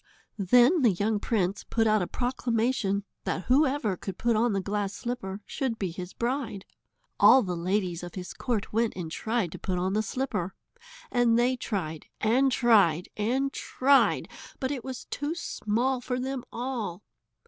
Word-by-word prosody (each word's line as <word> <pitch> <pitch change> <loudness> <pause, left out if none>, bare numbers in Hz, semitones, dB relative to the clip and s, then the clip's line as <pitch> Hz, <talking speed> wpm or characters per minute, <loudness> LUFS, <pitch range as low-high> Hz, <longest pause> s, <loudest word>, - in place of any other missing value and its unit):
Then 245 - +5
the 245 - +6
young 205 +3 0
prince 200 -3 0
put 225 -1 0
out 215 -1 +3
a 180 - -1
proclamation 235 -3 0 0.2
that 185 - -2
whoever 260 -6 +2
could 185 +1 -7
put 235 -1 +1
on 235 +2 +2
the 195 - +1
glass 200 +1 -2
slipper 210 -5 -4
should 260 -6 -2
be 190 -5 -2
his 180 +1 -7
bride. 235 -5 -3 0.5
All 260 - +8
the 180 -3 -2
ladies 180 0 -1
of 175 -1 -8
his 180 -1 -6
court 230 -6 -2
went 230 +1 +1
and 170 -3 -5
tried 220 -2 -1
to - - -8
put 185 -1 -2
on 185 +2 0
the 215 - +2
slipper. 215 -6 -3 0.6
And 240 -1 +3
they 245 +2 +3
tried 175 -10 -4
and 260 +5 +3
tried 200 -10 +4
and 260 +6 0
tried, 275 +2 +3 0.3
but 260 0 -1
it 265 -5 -4
was 260 -2 -6
too 290 +3 -3
small 250 -4 -1
for 250 0 -2
them 260 0 -3
all. 230 -7 -4
225 Hz, 170 wpm, -28 LUFS, 190-255 Hz, 0.6 s, All